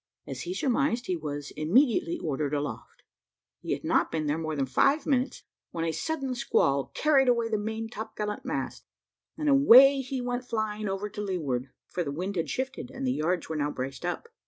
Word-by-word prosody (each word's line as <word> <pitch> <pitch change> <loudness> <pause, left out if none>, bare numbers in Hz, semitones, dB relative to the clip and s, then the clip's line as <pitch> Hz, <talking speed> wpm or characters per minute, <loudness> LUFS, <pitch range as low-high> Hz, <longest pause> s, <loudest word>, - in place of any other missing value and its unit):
As - - -6
he 360 +1 -4
surmised 270 -5 +1
he 185 - -1
was 145 -3 -5
immediately 185 - +2
ordered 150 -1 -2
aloft. 145 0 -5 0.6
He - - -2
had - - -5
not - - +2
been 155 -1 -1
there 150 +2 0
more 155 -1 -3
than 140 -2 0
five 275 - +2
minutes, 265 -1 0 0.3
when 165 -1 -3
a 165 - 0
sudden 275 - -2
squall 140 - +1
carried 280 -3 +4
away 235 -2 +2
the 215 -2 0
main 220 +2 -3
topgallant 215 -2 -5
mast, - - -4 0.5
and 305 -1 -2
away 275 -1 +8
he 265 0 -4
went 245 0 -2
flying 215 -2 -2
over 195 +2 -2
to 210 0 -6
leeward 145 -10 -2 0.2
(for 180 - -2
the 145 - -4
wind: 185 +7 -3
had 165 -4 -1
shifted, 260 -1 -3
and 270 +1 -5
the 255 - +1
yards 170 +1 -1
were 160 - -4
now 145 -1 0
braced 135 +1 -5
up). 175 - -3
210 Hz, 195 wpm, -28 LUFS, 155-260 Hz, 0.6 s, away